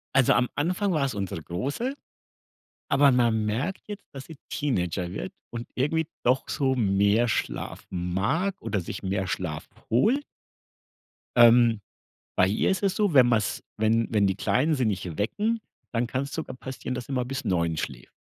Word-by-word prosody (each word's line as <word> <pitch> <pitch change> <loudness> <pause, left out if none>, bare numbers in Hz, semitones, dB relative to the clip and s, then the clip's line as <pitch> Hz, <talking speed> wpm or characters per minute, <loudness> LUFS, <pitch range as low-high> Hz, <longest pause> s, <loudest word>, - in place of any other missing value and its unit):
Also, 135 -3 +5
am 125 - +4
Anfang 180 +5 0
war 150 -3 +1
es 135 - 0
unsere 95 -6 -4
Große, 140 - -2 1.0
aber 140 -1 +5
man 115 -3 +3
merkt 140 - -2
jetzt, 205 -1 -7
dass 135 -1 -8
sie 160 -3 -11
Teenager 90 - -1
wird 95 - -5 0.2
und 120 0 -6
irgendwie 155 +5 +1 0.2
doch 125 +2 +2
so 135 -3 +1
mehr 100 +1 +3
Schlaf 110 - -3
mag 100 - -1
oder 105 -3 -1
sich 85 - -6
mehr 95 0 -1
Schlaf 80 -5 -3 0.2
holt. 230 - +3 1.1
Ähm, 120 -2 +6 0.6
bei 90 - +5
ihr 100 - +1
ist 190 - 0
es 195 -2 +2
so, 205 -5 +1
wenn 130 -3 +7
man's 115 -3 +1
wenn 110 +1 +2
wenn 105 -3 +3
die 95 0 0
Kleinen 150 +9 +2
sie 130 -3 0
nicht 90 -5 -3
wecken, 215 - 0 0.3
dann 120 +1 +1
kann's 135 +3 -3
sogar 160 -5 -5
passieren, 130 0 -5
dass 125 -1 -5
sie 135 - -6
mal 125 -2 0
bis 135 +2 -4
9:00 85 -3 +1
schläft. 65 -5 -5
120 Hz, 170 wpm, -26 LUFS, 100-145 Hz, 1.1 s, wenn